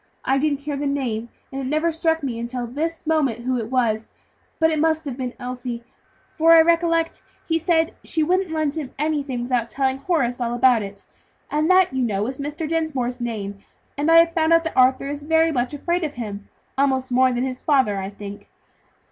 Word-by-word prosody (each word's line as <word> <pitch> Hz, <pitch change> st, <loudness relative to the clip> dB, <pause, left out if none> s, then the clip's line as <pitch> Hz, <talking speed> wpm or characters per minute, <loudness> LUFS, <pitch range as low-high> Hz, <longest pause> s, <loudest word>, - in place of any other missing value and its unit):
I 270 Hz, 0 st, +2 dB
didn't 285 Hz, -1 st, 0 dB
hear 290 Hz, 0 st, -3 dB
the 285 Hz, +1 st, -2 dB
name, 240 Hz, -5 st, -2 dB, 0.2 s
and 270 Hz, 0 st, -4 dB
it 260 Hz, -, -3 dB
never 310 Hz, +4 st, +1 dB
struck 320 Hz, -1 st, 0 dB
me 240 Hz, -4 st, -3 dB
until 240 Hz, +1 st, -3 dB
this 315 Hz, +8 st, -4 dB
moment 275 Hz, -7 st, 0 dB
who 255 Hz, -1 st, 0 dB
it 225 Hz, -1 st, -5 dB
was; 230 Hz, -4 st, 0 dB, 0.5 s
but 320 Hz, -1 st, +3 dB
it 310 Hz, -, 0 dB
must 320 Hz, 0 st, +1 dB
have 270 Hz, -4 st, -4 dB
been 250 Hz, -1 st, -5 dB
Elsie, 245 Hz, -1 st, -5 dB, 0.5 s
for 330 Hz, +1 st, +6 dB
I 330 Hz, -, +9 dB
recollect 330 Hz, 0 st, +1 dB, 0.3 s
he 325 Hz, 0 st, +1 dB
said 330 Hz, -1 st, +1 dB
she 320 Hz, -, 0 dB
wouldn't 365 Hz, +3 st, +1 dB
lend 310 Hz, -3 st, -1 dB
him 300 Hz, -5 st, -6 dB
anything 285 Hz, -4 st, -1 dB
without 240 Hz, -2 st, 0 dB
telling 265 Hz, 0 st, 0 dB
Horace 265 Hz, -7 st, 0 dB
all 240 Hz, 0 st, -1 dB
about 245 Hz, -2 st, +4 dB
it, 200 Hz, 0 st, -8 dB, 0.5 s
and 305 Hz, +3 st, +1 dB
that, 370 Hz, -5 st, +5 dB
you 260 Hz, -, 0 dB
know, 210 Hz, -4 st, 0 dB
is 260 Hz, +3 st, -5 dB
Mr. 300 Hz, +3 st, -4 dB
Dinsmore's 275 Hz, -7 st, -2 dB
name; 205 Hz, -4 st, -4 dB, 0.4 s
and 295 Hz, +2 st, 0 dB
I 330 Hz, -, +7 dB
have 335 Hz, 0 st, +5 dB
found 325 Hz, -1 st, +3 dB
out 330 Hz, 0 st, +5 dB
that 325 Hz, -, -4 dB
Arthur 260 Hz, +2 st, +4 dB
is 290 Hz, +1 st, -4 dB
very 320 Hz, +2 st, +3 dB
much 245 Hz, -3 st, -1 dB
afraid 345 Hz, +4 st, -1 dB
of 300 Hz, -2 st, -3 dB
him; 205 Hz, -4 st, -6 dB, 0.3 s
almost 265 Hz, -2 st, +1 dB
more 255 Hz, +1 st, +4 dB
than 245 Hz, 0 st, -1 dB
of 265 Hz, -, 0 dB
his 255 Hz, 0 st, -7 dB
father, 260 Hz, -9 st, +2 dB
I 190 Hz, 0 st, -4 dB
think. 205 Hz, 0 st, -10 dB
275 Hz, 210 wpm, -22 LUFS, 245-320 Hz, 0.5 s, I